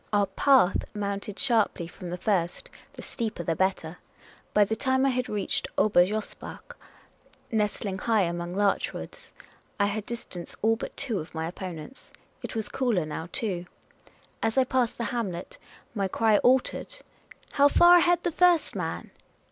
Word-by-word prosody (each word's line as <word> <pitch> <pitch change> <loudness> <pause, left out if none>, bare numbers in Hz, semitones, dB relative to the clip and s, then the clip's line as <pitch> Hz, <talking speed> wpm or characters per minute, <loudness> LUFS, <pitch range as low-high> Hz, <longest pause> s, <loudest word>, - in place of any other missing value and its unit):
Our 205 -1 +3
path 205 0 +3
mounted 200 0 -3
sharply 225 -9 +1
from 175 +1 -9
the 180 - -4
first; 180 -3 -1 0.2
the - - -10
steeper 220 -7 -4
the 165 0 -1
better. 185 -3 -1 0.5
By 205 -1 +5
the 220 - -2
time 260 +3 +1
I - - +4
had 250 -1 -1
reached 210 -1 -1
Ober 200 -4 +5
Josbach, 215 +1 -6 0.8
nestling 210 -3 -1
high 220 0 +2
among 175 0 -3
larch 200 0 +1
woods, - - -9 0.5
I 200 - +4
had 205 +1 -3
dis 235 -1 -5
tanced 175 -2 -8
all 225 +1 +4
but 225 - -7
two 235 -8 -1
of 160 +1 -9
my 160 0 -2
opponents. 180 +6 -8 0.3
It - - -6
was 220 -2 -2
cooler 230 -11 0
now 160 +2 -6
too. 190 -8 -2 0.7
As 225 +1 0
I 265 - +6
passed 255 -2 0
the 235 - -2
hamlet 190 -8 -4 0.3
my 200 -3 0
cry 215 +2 +3
altered. 255 +1 +1 0.2
* - - -35
' - - -27
How 285 0 +5
far 345 +4 +7
ahead 350 0 +3
the 345 - 0
first 350 0 +3
man - - -4
210 Hz, 170 wpm, -27 LUFS, 180-245 Hz, 0.8 s, far